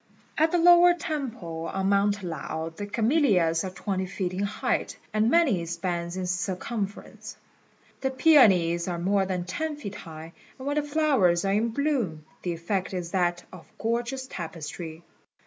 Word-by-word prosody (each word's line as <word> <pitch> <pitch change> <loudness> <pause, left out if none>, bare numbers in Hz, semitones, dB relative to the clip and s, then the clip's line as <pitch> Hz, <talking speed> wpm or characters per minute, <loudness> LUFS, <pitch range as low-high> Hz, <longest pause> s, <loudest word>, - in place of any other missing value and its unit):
At 315 +1 +3
the 355 - +3
lower 350 +1 +7
temple 235 - -4
on 195 0 0
Mount 200 0 +2
Lao 160 -1 -4
the 205 +2 -5
camellias 210 - +2
are 190 - -3
twenty 185 0 -3
feet 185 -1 -3
in 185 - -4
height, 235 +5 -2 0.2
and 215 +1 +3
many 265 - +3
spans 170 0 -3
in 185 - -2
circumference. 195 +3 -4 0.6
The 265 - 0
peonies 195 - +5
are 175 -1 -2
more 190 +2 +1
than 180 -2 -2
ten 300 - -3
feet 210 -9 -7
high; 160 -3 -9 0.2
and 260 - -9
when 290 +1 -1
the - - +3
flowers 285 - +2
are 195 - +1
in 220 +3 +1
bloom 230 - -1 0.2
the 175 - -2
effect 185 +3 -2
is 175 -2 -4
that 175 -2 0
of 175 -3 -13
gorgeous 240 +3 -2
tapestry. 165 - -7
195 Hz, 160 wpm, -26 LUFS, 175-260 Hz, 0.6 s, lower